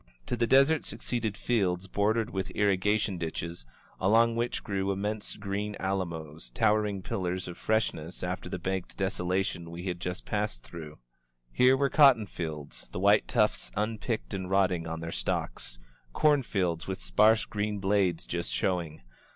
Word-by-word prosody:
To - - -1
the 115 0 +1
desert 135 +4 +5
succeeded 115 -3 -3
fields 95 -6 0
bordered 110 +4 +1
with 95 -1 -3
irrigation 100 -1 +2
ditches, 85 -4 -5 0.3
along 115 +4 +4
which 120 +1 -1
grew 100 -1 -1
immense 105 +2 -3
green 100 +1 -3
alamos, 80 -8 -3
tow 110 -2 +4
ering 105 -3 -1
pillars 90 -1 -2
of 90 - -6
freshness 90 -7 -1
after 90 0 -3
the - - -3
baked 95 +1 -3
desolation 90 -3 -1
we 85 +1 -7
had 90 -2 -3
just 90 +2 -4
passed 105 - -2
through. 80 -3 -9 0.6
Here 130 +1 +5
were 140 -1 +1
cotton 135 -8 +6
fields, 80 -6 -6
the - - -4
white 100 +2 +4
tufts 105 -3 +1
unpicked 105 - -2
and 95 -1 -3
rotting 95 -4 +2
on 80 0 -4
their 80 0 -4
stalks; - - -3 0.4
corn 150 -2 +4
fields 90 -8 -1
with 95 - -3
sparse 105 - +4
green 105 0 -2
blades 95 -3 +1
just 85 0 -3
showing. 85 -6 -1
95 Hz, 155 wpm, -29 LUFS, 85-105 Hz, 0.6 s, cotton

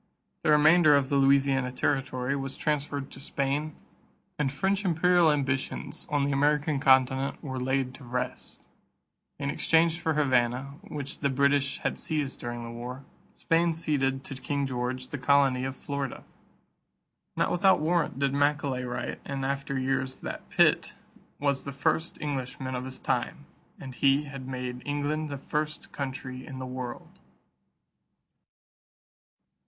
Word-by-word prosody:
The - - 0
remainder 155 +1 +6
of 135 -2 +2
the 140 - +1
Louisiana 135 -1 +3
territory 130 0 0
was 135 -1 -4
transferred 145 -2 -2
to - - -10
Spain 140 +2 -2 0.6
and 140 -3 +1
French 190 +8 0
imperial 175 -1 +4
ambitions 135 -2 -2
on 145 -2 +1
the 140 - 0
American 145 +1 +2
continent 130 +1 +3
were 130 -3 -4
laid 130 0 0
to 135 - -12
rest. 125 +1 -5 0.7
In 140 0 -2
exchange 165 +2 +3
for 160 -3 0
Havana, 130 -1 +1
which 145 -3 -6
the 140 - +1
British 140 +1 +2
had - - -1
seized 150 -4 -2
during 120 0 -5
the 115 - -6
war, 125 +3 -7 0.3
Spain 165 0 +2
ceded 135 -4 0
to - - -7
King 140 +1 -2
George 130 0 -3
the 145 - -5
colony 135 -1 +3
of 130 0 -3
Florida. 140 -2 -4 1.1
Not - - +1
without 190 +2 +4
warrant 165 -2 +1
did 140 0 +1
Macaulay 140 -2 +1
write 120 0 -4
in 135 -1 -4
after 140 0 -2
years 130 0 -1
that - - -6
Pitt - - +3 0.4
"was 140 -1 0
the 140 - -5
first 160 +4 0
Englishman 130 -2 -3
of 125 0 -3
his 130 0 -7
time; - - -2 0.3
and 130 -1 -8
he 140 +3 +3
had 135 -3 -8
made 125 -1 -4
England 145 +2 -1
the 140 - -4
first 150 +2 -3
country 130 -2 -5
in 130 - -8
the 130 - -5
world." 125 -1 -7
140 Hz, 145 wpm, -28 LUFS, 130-150 Hz, 1.1 s, remainder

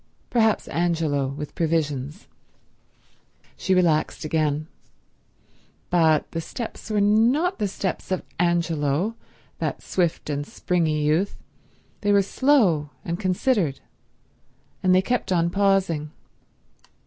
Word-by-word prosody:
Perhaps 225 -3 +2
Angelo, 160 -5 0
with 145 +2 -6
provisions. 155 - -2 1.3
She 190 - 0
relaxed 165 -4 +1
again. 155 -1 0 1.3
But 160 -3 +3
the 165 - -3
steps 225 +7 -7
were 215 -1 +1
not 235 - +3
the 210 - +1
steps 190 -1 -4
of 185 -2 -1 0.2
Angelo, 170 +2 +1 0.4
that - - -3
swift 175 -3 -1
and 145 0 -2
springy 155 -1 -1
youth; 165 +7 +1 0.6
they 205 - +2
were 200 -1 +5
slow 200 - +2 0.2
and 170 +1 -3
considered, 185 - +1 1.0
and 185 -1 +4
they 185 - +4
kept 245 -2 -1
on 170 -1 +2
pausing. 195 -6 +1
175 Hz, 110 wpm, -24 LUFS, 155-200 Hz, 1.3 s, were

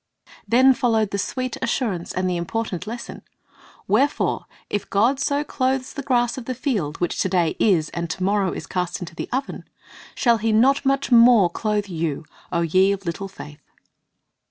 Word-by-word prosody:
Then 260 +3 +5
followed 225 -4 +1
the 200 - -2
sweet 255 +3 -3
assurance 230 -8 -2
and 185 0 -1
the 180 - 0
important 180 +1 -3
lesson, 235 +2 -7 0.7
"Wherefore, 260 +9 +1 0.2
if 205 - -3
God 235 +7 +2
so 285 +1 0
clothe 265 -2 -1
the 280 - -6
grass 250 -1 0
of 240 - -10
the 255 - -3
field, 210 - -2
which 175 - -1
to 190 - +1
day 175 -3 +1
is, 170 -8 +2
and 170 -1 -4
to 185 - -4
morrow 195 -1 +1
is - - -6
cast 180 -1 -3
into 175 -2 -7
the - - -6
oven, 270 +2 -3 0.5
shall 235 -2 +3
He 225 +1 0
not 260 +7 +4
much 275 0 0
more 230 -6 +6
clothe 210 +1 -1
you, 165 -4 -3 0.3
O 170 -1 0
ye 185 +4 +3
of 195 -1 -4
little 170 +3 -4
faith?" 150 -6 -12
210 Hz, 180 wpm, -22 LUFS, 180-250 Hz, 0.7 s, more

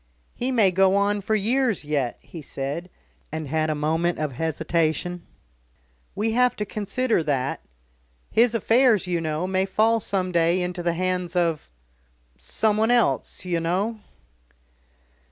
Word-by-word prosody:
"He 250 +2 -2
may 220 -7 +4
go 190 +1 +3
on 200 +1 +1
for 215 +2 0
years 230 - +1
yet," 140 -5 -1
he 165 - -10
said, 145 +5 -5 0.4
and 155 -1 -4
had 155 +2 0
a 155 - 0
moment 160 +3 0
of 155 -2 -2
hesitation. 160 +4 -1 0.9
"We 220 +3 0
have 250 +2 +3
to 210 - -3
consider 215 +2 -1
that. 135 -4 -1 0.7
His 235 +1 +3
affairs, 230 -1 +3
you 175 -2 -1
know, 155 +2 -2
may 190 0 0
fall 220 +4 +2
some 185 -3 -2
day 170 +1 +2
into 180 0 -4
the 170 -1 0
hands 180 0 -2
of 170 - 0 0.7
someone 215 - 0
else, 240 -5 +1
you 175 -2 0
know." 190 +7 -1
180 Hz, 140 wpm, -24 LUFS, 160-215 Hz, 0.9 s, may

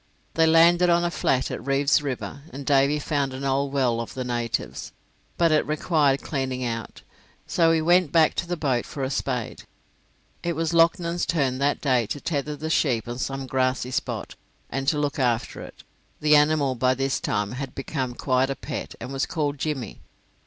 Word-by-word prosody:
They 160 0 +4
landed 170 +2 +5
on 170 0 +3
a 175 - 0
flat 130 -5 0
at - - -5
Reeve's 140 +2 +2
River, 140 0 -5
and 140 +1 -8
Davy 140 +1 +3
found 145 -2 -1
an 135 - -6
old 135 +1 0
well 125 -4 +1
of 115 - -8
the 130 - -3
natives, 115 - -3 0.4
but 170 -2 +3
it 155 - +4
required 150 -2 +1
cleaning 130 -3 -2
out, 115 -1 -5 0.4
so 165 -1 +3
he 160 -1 +2
went 175 -2 +4
back 160 -2 +4
to 170 - -1
the 175 0 -2
boat 130 -6 0
for 140 - -5
a 130 - -2
spade. 125 -4 -3 0.8
It 170 - -1
was 165 +1 -1
Loughnan's 170 +1 +2
turn 135 -6 0
that 140 +1 +1
day 125 -6 +2
to 110 - -4
tether 150 -1 -2
the 155 +2 -4
sheep 120 -9 +1
on 120 +1 -5
some 135 0 -3
grassy 130 -1 0
spot, - - -3 0.4
and 135 +2 -3
to 150 - +3
look 145 -1 -1
after 120 -2 0
it; - - -11 0.4
the 150 0 +5
animal 150 -2 +3
by 130 +1 +1
this 135 +1 -1
time 105 0 -1
had 135 +1 -6
become 130 -2 -3
quite 130 +1 +1
a 135 - -2
pet, - - -6
and 130 - -7
was 135 - -1
called 150 -4 -2
Jimmy. 135 -9 -4
140 Hz, 190 wpm, -25 LUFS, 130-155 Hz, 0.8 s, landed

